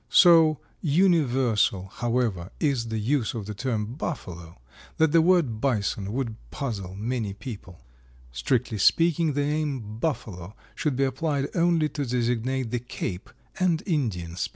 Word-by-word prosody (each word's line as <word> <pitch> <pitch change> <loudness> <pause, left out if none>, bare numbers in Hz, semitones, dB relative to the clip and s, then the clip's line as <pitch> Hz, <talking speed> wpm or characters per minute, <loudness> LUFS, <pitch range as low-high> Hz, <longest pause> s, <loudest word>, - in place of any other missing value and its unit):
So 165 -4 +6 0.2
universal, 135 - +2
however, 115 -7 -1
is 135 -7 0
the 110 0 -3
use 120 +2 0
of 110 -3 -4
the 105 - -5
term 110 0 -2
Buffalo 90 - -6 0.4
that 160 -1 +3
the 165 - +6
word 160 -11 +2
Bison 105 -6 0
would 115 -2 -3
puzzle 100 -9 -4
many 110 -1 -3
people. 100 -7 -9 0.5
Strictly 110 - -1
speaking, 165 - +3
the 145 +1 0
name 140 -8 -2
buffalo 105 - -3 0.2
should 150 -4 -1
be 135 - +1
applied 140 +1 -1
only 170 -2 +3
to 145 0 -3
designate 125 0 -1
the 120 - 0
Cape 100 -6 -5 0.3
and 175 -4 +2
Indian 115 - -1
species. - - -1
125 Hz, 140 wpm, -26 LUFS, 105-150 Hz, 0.5 s, So